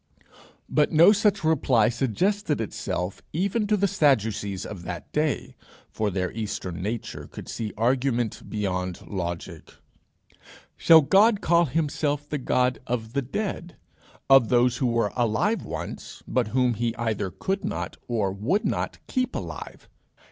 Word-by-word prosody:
But 150 - +2
no 170 +5 +7
such 205 -2 +2
reply 130 -8 +3
suggested 150 - 0
itself 95 -4 -3
even 200 +6 0
to 210 0 +2
the 200 +1 +2
Sadducees 110 - +1
of 100 -5 -7
that 85 -1 -7
day, 150 -1 -1 0.4
for 110 -1 -1
their 90 -1 -2
eastern 100 -5 -4
nature 110 +4 -4
could - - -10
see 110 -2 -4
argument 120 -1 0
beyond 90 -4 -3
logic. 85 -3 -5 1.0
Shall 165 -1 +7
God 200 +8 +4
call 170 -1 +3
himself 145 -1 -1
the 150 -1 -3
God 125 0 +1
of 115 -2 -3
the 140 - +1
dead, 175 - -4 0.5
of 135 -4 +6
those 125 0 +3
who 130 - +1
were 115 -3 0
alive 120 - +1
once, - - -7
but - - 0
whom 125 +1 +2
he 115 +1 -2
either 110 -4 -2
could 195 - -3
not - - -3
or 110 -5 0
would 130 - 0
not - - -2
keep 255 -1 -1
alive? - - -7
125 Hz, 140 wpm, -25 LUFS, 105-160 Hz, 1.0 s, no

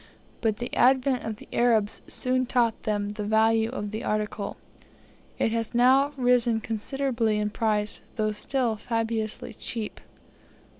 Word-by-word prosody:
But 220 -2 +1
the 240 0 -5
advent 260 0 +3
of 220 - -3
the - - -14
Arabs 225 -3 +2
soon 255 0 +1
taught 235 -3 +1
them 205 -1 0
the 210 0 -5
value 220 +1 +3
of 210 -5 -4
the 220 - -4
article. 210 -1 -2 0.8
It 225 - +1
has 230 +1 -2
now 265 +4 +5
risen 245 -3 +3
considerably 230 0 -1
in 210 0 -1
price, 215 -2 0
though 215 -1 0
still 230 +1 -1
fabulously 225 -1 -2
cheap. 225 -3 -5
225 Hz, 140 wpm, -26 LUFS, 215-245 Hz, 0.8 s, now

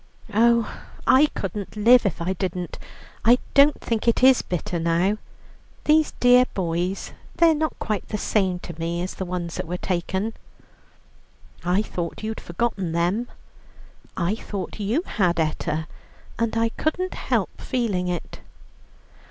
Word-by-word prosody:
"Oh, 235 +1 +3 0.3
I 280 +4 +6
couldn't 200 +2 -4
live 230 +2 +6
if 170 -2 -3
I 185 +2 0
didn't. 180 -2 -4 0.4
I 240 +2 +6 0.2
don't 285 +1 +6
think 230 0 -2
it 235 +2 +3
is 260 -1 +7
bitter 175 0 -3
now. 170 +5 +1 0.6
These 310 0 +3
dear 250 0 +6
boys, 180 +1 -2 0.2
they're 335 -1 +5
not 310 0 -1
quite 210 -5 -3
the 210 - -3
same 190 -3 +1
to 170 - -7
me 170 +1 -2
as 185 - -4
the 190 - -5
ones 175 -2 -4
that - - -4
were 180 +2 -3
taken." 190 +4 -2 1.3
"I 180 +4 +2
thought 175 -1 -5
you'd 220 0 -4
forgotten 185 -2 -2
them." 180 +8 0 0.9
"I 180 +2 +1
thought 205 -2 -6
you 220 - 0
had, 175 -4 +1
Etta, 155 0 -1 0.5
and 230 -1 0
I 230 0 +2
couldn't 360 +9 -2
help - - -2
feeling 210 -8 -1
it." 175 -1 -4
200 Hz, 145 wpm, -24 LUFS, 175-235 Hz, 1.3 s, is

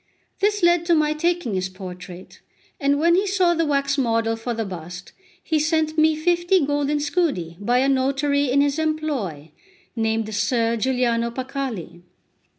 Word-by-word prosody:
This 410 0 +1
led 345 0 +4
to 340 - +4
my 305 -1 +2
taking 340 -6 -1
his 185 0 -1
portrait; 185 -1 -10 0.4
and 280 -1 +2
when 340 +2 +4
he 390 +3 +2
saw 370 -3 +2
the 330 -1 0
wax 280 -1 0
model 230 -2 +1
for 230 +1 -4
the 225 -1 -2
bust, 180 0 -8 0.3
he 315 -1 0
sent 315 0 0
me 315 0 +4
fifty 345 +1 +2
golden 290 +1 0
scudi 290 - -1
by 240 +5 +1
a 265 +2 +3
notary 275 +1 +1
in 275 +3 +3
his 285 +2 0
employ, 280 - -2 0.4
named 220 -1 -1
Ser 230 +2 +1
Giuliano 235 -1 0
Paccalli. 250 - -5
275 Hz, 155 wpm, -22 LUFS, 225-310 Hz, 0.4 s, led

